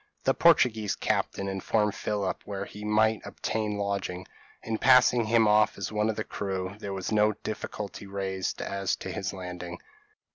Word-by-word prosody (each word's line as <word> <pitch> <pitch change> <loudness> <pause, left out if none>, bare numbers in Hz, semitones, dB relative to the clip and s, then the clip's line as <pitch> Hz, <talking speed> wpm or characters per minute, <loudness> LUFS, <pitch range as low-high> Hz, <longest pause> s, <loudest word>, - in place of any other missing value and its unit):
The - - +3
Portuguese 110 -4 +4
captain 100 - -1
informed 100 +2 0
Philip 100 -3 -2
where 100 -1 -4
he 105 +1 -10
might 110 +1 +2
obtain 105 -2 -2
lodging; 100 -2 -2 0.4
and 110 -1 -3
passing 125 -2 +6
him 115 0 +4
off 105 +1 +4
as - - -4
one 105 0 +1
of 110 - -2
his 110 - -2
crew, 95 -1 -3
there 100 - -5
was 95 +1 -4
no 105 0 +4
difficulty 105 -1 -6
raised 95 -1 -3
as 100 -1 -1
to - - -6
his 100 -3 -3
landing. 90 -2 -7
105 Hz, 160 wpm, -28 LUFS, 95-110 Hz, 0.4 s, passing